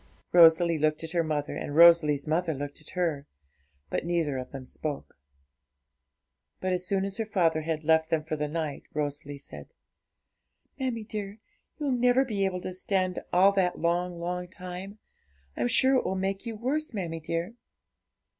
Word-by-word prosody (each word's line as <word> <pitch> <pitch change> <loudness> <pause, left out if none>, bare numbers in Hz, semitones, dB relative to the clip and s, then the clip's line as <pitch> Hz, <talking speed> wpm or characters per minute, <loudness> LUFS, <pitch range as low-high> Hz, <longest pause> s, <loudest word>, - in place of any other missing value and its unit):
Rosalie 170 -1 +6
looked 155 +1 +1
at 160 - -5
her 170 -1 +1
mother, 150 -2 -2
and 145 - -5
Rosalie's 160 -3 +6
mother 160 0 0
looked 145 +2 -6
at 155 - -11
her, 160 -6 -1 0.6
but - - -1
neither 165 -5 0
of 125 - -7
them 135 -2 -8
spoke. 145 +1 -5 1.5
But 185 0 -1
as 180 0 -2
soon 195 0 +1
as 195 0 -5
her 225 - -1
father 165 -6 +2
had 160 0 -3
left 160 0 +3
them 160 -2 +1
for 155 0 -3
the 150 0 -2
night, 155 -2 -3
Rosalie 145 -1 -3
said 140 - -11 1.1
'Mammie 250 -4 -2
dear, 210 -1 -5 0.4
you'll 295 -3 -1
never 250 +1 +3
be 205 -5 -1
able 180 -1 -2
to 185 - -5
stand 185 0 0
all 190 +3 +6
that 190 -3 +1
long, 175 +1 -1
long 180 +1 -3
time; 185 +3 -8 0.6
I'm 120 - 0
sure 260 - +4
it - - +1
will 190 - -2
make 195 +4 -2
you 225 - -4
worse, 265 +4 -2
mammie 170 -4 -3
dear.' 165 +6 -3
175 Hz, 170 wpm, -28 LUFS, 155-195 Hz, 1.5 s, Rosalie